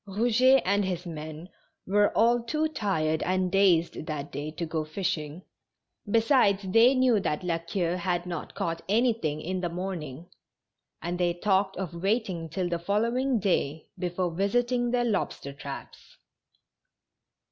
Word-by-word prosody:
Eouget 240 +6 +4
and 200 +2 +2
his 180 -1 -3
men 155 0 -7 0.4
were 205 +2 +3
all 235 +2 +4
too 305 +7 0
tired 160 - -1
and 185 0 0
dazed 175 -5 +2
that 145 -2 -4
day 145 +2 -4
to 165 +2 -4
go 160 -1 -2
fishing, 155 -1 -3 0.7
besides 225 -3 +3
they 230 +6 +6
knew 255 -4 +4
that 150 -3 -2
La 170 -2 0
Queue 170 +1 -2
had 175 -1 -1
not 175 -3 -6
caught 165 0 -2
any 235 +4 +3
thing 155 -9 -3
in 185 +4 -3
the 175 - -1
morning, 170 -4 -5 0.8
and 175 +1 -3
they 175 -1 +1
talked 195 +1 +1
of 185 -2 -4
waiting 195 -5 -1
till 180 +3 -2
the 170 -1 -2
following 235 +7 +1
day 160 -6 0
before 180 0 -2
visiting 240 +7 +1
their 245 0 +1
lobster 195 -10 -2
traps. 140 0 -9
185 Hz, 145 wpm, -27 LUFS, 165-215 Hz, 0.8 s, they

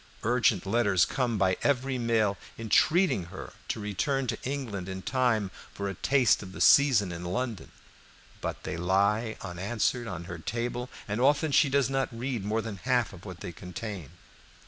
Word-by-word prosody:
Urgent 115 -4 +2
letters 100 -6 +3
come 120 -4 -1
by 95 -2 +2
every 135 -2 +1
mail 110 -4 +2 0.2
entreating 115 - +3
her 85 - -9
to - - -2
return 105 +7 -1
to 115 -2 -2
England 120 -9 -4
in 95 0 -5
time 120 -6 +1 0.2
for 100 - -3
a 100 - -3
taste 130 +6 +3
of 95 -2 -9
the - - -8
season 125 -10 +5
in 85 0 -6
London, 100 +2 -3 0.7
but - - -4
they - - -4
lie 100 +6 +1
unanswered 100 +6 -1
on 90 -3 -5
her 85 -1 -7
table, 120 +7 -3 0.2
and 105 +3 -2
often 145 +3 +3
she 145 0 +5
does 140 -1 +3
not 135 -1 0
read 120 -2 -3
more 110 +2 -1
than 110 -3 -5
half 125 0 0
of 90 +1 -12
what 90 -4 -9
they - - -5
contain. 90 - -7
110 Hz, 170 wpm, -28 LUFS, 95-125 Hz, 0.7 s, season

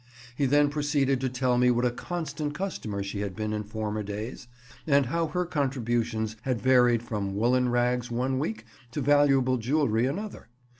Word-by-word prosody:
He 140 +1 +1
then 145 +2 +4
proceeded 145 -3 +1
to 130 - 0
tell 125 -1 +1
me 125 0 +5
what 120 0 +2
a 125 - +2
constant 150 0 -4
customer 115 - -3
she 100 +1 -5
had 100 -2 -3
been 110 0 -2
in 105 - -1
former 105 0 -3
days, 105 +4 -6 0.4
and 140 -2 +4
how 165 +6 0
her 180 +4 -1
contributions 120 -8 -1
had 125 -3 -1
varied 125 -1 +4
from 100 -4 -3
woollen 125 +4 +2
rags 120 0 +1
one 130 +2 -1
week 110 -4 -3 0.3
to 150 - -2
valuable 135 -2 +4
jewellery 120 -2 +1
another. 200 +10 -5
125 Hz, 170 wpm, -27 LUFS, 110-145 Hz, 0.4 s, me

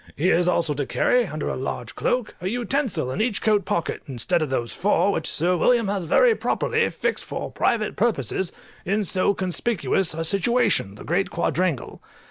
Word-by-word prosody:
He 175 +6 +2
is 175 +1 +3
also 170 -4 +1
to 145 -2 -3
carry, 245 -3 +2
under 155 -3 -4
a - - -2
large 125 -2 -5
cloak, 245 -3 -1
a 180 - -3
utensil 240 - -1
in 185 - -2
each 220 -3 0
coat 210 -2 +2
pocket, 170 - -2
instead 140 +7 0
of 155 - -1
those 120 -3 -2
four 200 +1 +2
which - - -2
Sir 175 +3 +2
William 230 +4 +2
has 195 -3 -2
very 475 - +5
properly 450 +1 0
fixed - - -2
for - - -5
private 215 -3 0
purposes 210 -5 0 0.3
in 205 +3 0
so 190 +2 +2
conspicuous 185 -2 0
a 165 0 -1
situation, 200 - +1
the - - -11
great 180 +4 0
quadrangle. 170 -3 -1
185 Hz, 180 wpm, -23 LUFS, 160-220 Hz, 0.3 s, very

